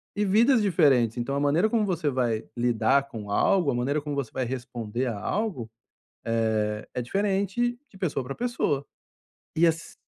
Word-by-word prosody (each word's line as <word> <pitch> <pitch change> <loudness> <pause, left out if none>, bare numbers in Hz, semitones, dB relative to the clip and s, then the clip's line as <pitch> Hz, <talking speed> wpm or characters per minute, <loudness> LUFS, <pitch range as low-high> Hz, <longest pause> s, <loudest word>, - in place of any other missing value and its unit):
e 210 - +1
vidas 230 +5 +4
diferentes. 140 - +3
Então 120 +4 -2
a - - 0
maneira 155 +9 +2
como 220 -2 +1
você 170 -6 0
vai 120 -4 0
lidar 125 +4 +2
com 110 -6 -8
algo, 175 - +3
a - - -2
maneira 140 +5 0
como 145 -1 -4
você 135 -5 -3
vai 130 - -1
responder 120 -1 -4
a 115 -4 -2
algo, 155 - -2 1.0
eh, 105 0 -5
é 125 - -1
diferente 200 - 0
de 190 - -17
pessoa 145 -8 -2
pra 135 +2 -5
pessoa. 190 - -1 0.7
E 165 - +4
as 165 0 -1
140 Hz, 175 wpm, -26 LUFS, 120-195 Hz, 1.0 s, vidas